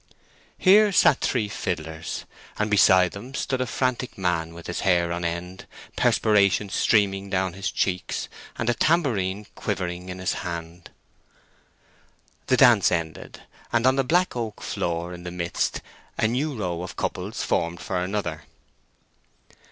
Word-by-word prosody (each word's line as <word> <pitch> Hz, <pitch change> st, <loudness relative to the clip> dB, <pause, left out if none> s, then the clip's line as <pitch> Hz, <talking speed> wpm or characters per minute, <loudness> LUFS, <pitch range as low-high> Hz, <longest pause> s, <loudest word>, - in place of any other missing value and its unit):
Here 205 Hz, +2 st, +6 dB
sat 150 Hz, -7 st, +4 dB
three 115 Hz, -5 st, 0 dB
fiddlers, 80 Hz, -5 st, -4 dB, 0.3 s
and 105 Hz, 0 st, -1 dB
beside 95 Hz, -3 st, +5 dB
them 125 Hz, +7 st, -9 dB
stood 130 Hz, -1 st, -1 dB
a 130 Hz, -, -1 dB
frantic 125 Hz, 0 st, -2 dB
man 90 Hz, -3 st, -1 dB
with 85 Hz, -, -10 dB
his 85 Hz, -, -4 dB
hair 85 Hz, -3 st, +2 dB
on 85 Hz, 0 st, -4 dB
end, 85 Hz, +2 st, -4 dB, 0.3 s
perspiration 100 Hz, -1 st, +3 dB
streaming 100 Hz, -1 st, +2 dB
down 95 Hz, -2 st, 0 dB
his 95 Hz, +2 st, -3 dB
cheeks, 90 Hz, -2 st, -2 dB, 0.3 s
and 120 Hz, -, -2 dB
a 120 Hz, -, +4 dB
tambourine 105 Hz, -, +1 dB
quivering 90 Hz, -3 st, -4 dB
in 90 Hz, -, -6 dB
his 95 Hz, 0 st, -1 dB
hand. 85 Hz, -1 st, -6 dB, 1.6 s
The -, -, +3 dB
dance -, -, +6 dB
ended, 85 Hz, -2 st, -4 dB, 0.3 s
and 120 Hz, 0 st, +2 dB
on 130 Hz, 0 st, +5 dB
the 135 Hz, -, +2 dB
black 175 Hz, +6 st, +2 dB
oak 115 Hz, -3 st, -4 dB
floor 85 Hz, +1 st, -2 dB
in 90 Hz, -, -9 dB
the 90 Hz, -, -6 dB
midst 85 Hz, -1 st, -2 dB, 0.4 s
a 110 Hz, -, +2 dB
new 135 Hz, +5 st, -1 dB
row 90 Hz, -5 st, -2 dB
of 90 Hz, -, -7 dB
couples -, -, -3 dB
formed 85 Hz, +1 st, -1 dB
for 90 Hz, -2 st, -2 dB
another. 90 Hz, -5 st, -3 dB
95 Hz, 145 wpm, -25 LUFS, 85-115 Hz, 1.6 s, Here